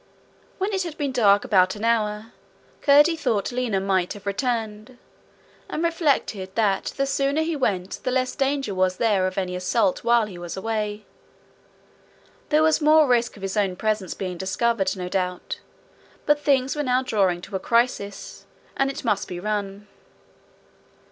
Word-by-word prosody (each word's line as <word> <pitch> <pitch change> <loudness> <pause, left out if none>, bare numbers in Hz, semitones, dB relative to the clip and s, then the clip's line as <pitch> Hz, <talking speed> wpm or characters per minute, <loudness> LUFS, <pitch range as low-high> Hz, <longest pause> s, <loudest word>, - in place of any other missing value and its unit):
When 400 +2 -2
it 385 - 0
had 335 -4 -5
been 285 -2 -1
dark 205 -5 +4
about 185 -1 +3
an 210 - -8
hour, 220 -1 0 0.5
Curdie 295 +3 +5
thought 245 -10 -1
Lina 240 -5 -1
might 190 -2 0
have 205 -1 -12
returned; 225 +1 -3 0.7
and 315 - -3
reflected 280 - 0
that 205 -4 +1
the 275 - +1
sooner 275 +3 0
he 325 0 -2
went 195 -9 -1
the - - -2
less 255 0 0
danger 275 -5 -1
was 185 -1 +1
there 200 -5 +2
of 185 - -6
any 180 -2 -2
assault 185 +2 0
while 235 -1 +3
he 185 -4 -9
was 175 +1 -6
away. 210 0 -3 1.4
There 305 0 +4
was 315 0 +3
more 310 +1 +6
risk 240 -2 +1
of 195 - -12
his 195 +1 -3
own 195 -3 +1
presence 215 -2 -2
being 185 -3 -5
discovered, 195 0 0
no 180 -1 -4
doubt, 180 -1 -3 0.7
but 295 0 +3
things 270 -2 +1
were 295 - -1
now 255 -2 +1
drawing 195 -8 +1
to 190 +2 -8
a - - 0
crisis, 230 -2 -1 0.3
and 275 0 +1
it 270 - -6
must 210 -3 0
be 175 - -6
run. 205 0 -4
215 Hz, 165 wpm, -24 LUFS, 195-265 Hz, 1.4 s, more